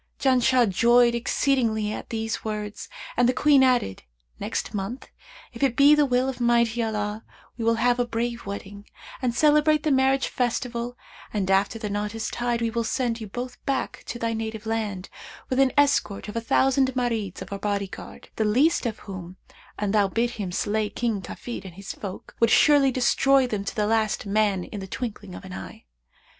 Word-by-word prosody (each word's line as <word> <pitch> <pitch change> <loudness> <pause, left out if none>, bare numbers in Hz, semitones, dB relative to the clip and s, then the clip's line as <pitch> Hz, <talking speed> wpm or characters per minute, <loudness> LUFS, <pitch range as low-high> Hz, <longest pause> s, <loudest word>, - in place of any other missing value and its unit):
Janshah 255 -1 +3
joyed 235 +5 +4
exceedingly 235 -3 0
at - - -7
these 225 -1 -3
words 210 -1 -5 0.3
and 245 0 +3
the - - +2
Queen 290 0 +4
added, 250 - +2 0.4
'Next - - -3
month, 205 +6 -5 0.4
if - - -9
it 270 -4 +2
be 285 +3 +7
the 300 -1 +4
will 250 0 +2
of 260 -2 -4
Almighty 235 -1 +2
Allah, 215 -1 -2 0.3
we 235 - -5
will 230 0 +3
have 245 +2 +2
a 245 - +1
brave 235 -1 -3
wedding 200 +1 -7 0.3
and 245 -2 0
celebrate 300 +1 +4
the 310 - +1
marriage 265 0 +3
festival 245 0 -2 0.3
and 195 -3 -1
after 195 +3 +2
the 220 -1 -4
knot 205 +1 -3
is 220 -1 -3
tied 240 -1 -1
we 230 - 0
will 235 0 -1
send 235 0 -1
you 215 - -5
both 245 +4 -7
back 275 -1 -2
to - - -4
thy 230 -1 -1
native 220 -1 -5
land, 215 -4 -3 0.4
with 255 - +1
an 270 -1 +4
escort 275 -9 +2
of 210 - -7
a 230 - -1
thousand 265 +2 +2
Marids 225 -7 -2
of 190 - -9
our 195 - -4
body 200 -1 -1
guard, - - -11
the 220 - +2
least 250 +6 +2
of 220 -2 -4
whom, 185 -2 -8 0.4
an 205 -1 -1
thou 205 -2 +3
bid 230 +5 0
him 205 -6 -5
slay 210 +3 -1
King 225 -5 -2
Kafid 235 +1 -7
and 185 -3 -10
his 195 +1 -7
folk, 195 -2 -8
would 230 - +4
surely 280 +4 +5
destroy 265 +1 +3
them 210 -5 -3
to - - -4
the 210 - +1
last 220 -1 0
man 200 -2 +1
in 205 - -7
the 190 - -7
twinkling 205 -4 -6
of - - -10
an 185 - -9
eye. - - -9
230 Hz, 195 wpm, -25 LUFS, 210-250 Hz, 0.4 s, be